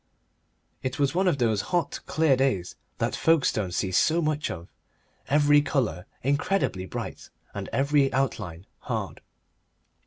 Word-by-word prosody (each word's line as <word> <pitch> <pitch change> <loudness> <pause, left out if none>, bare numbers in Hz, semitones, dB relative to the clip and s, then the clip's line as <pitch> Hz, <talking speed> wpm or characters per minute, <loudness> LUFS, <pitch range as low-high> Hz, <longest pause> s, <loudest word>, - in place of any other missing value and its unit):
It 130 -1 -3
was 140 0 +1
one 185 +2 +2
of 170 - +2
those 110 -5 +1
hot, 175 -2 0
clear 150 -1 +3
days 130 -9 0 0.2
that - - -1
Folkestone 135 - +2
sees 95 +1 +1
so 165 +2 +3
much 155 -2 0
of, 85 +1 -6 0.6
every 145 +1 +5
colour 110 - -1 0.2
incredibly 140 - 0
bright - - -6 0.2
and - - -5
every 140 0 +2
outline 100 -10 -2
hard. - - -4
135 Hz, 130 wpm, -26 LUFS, 100-150 Hz, 0.6 s, every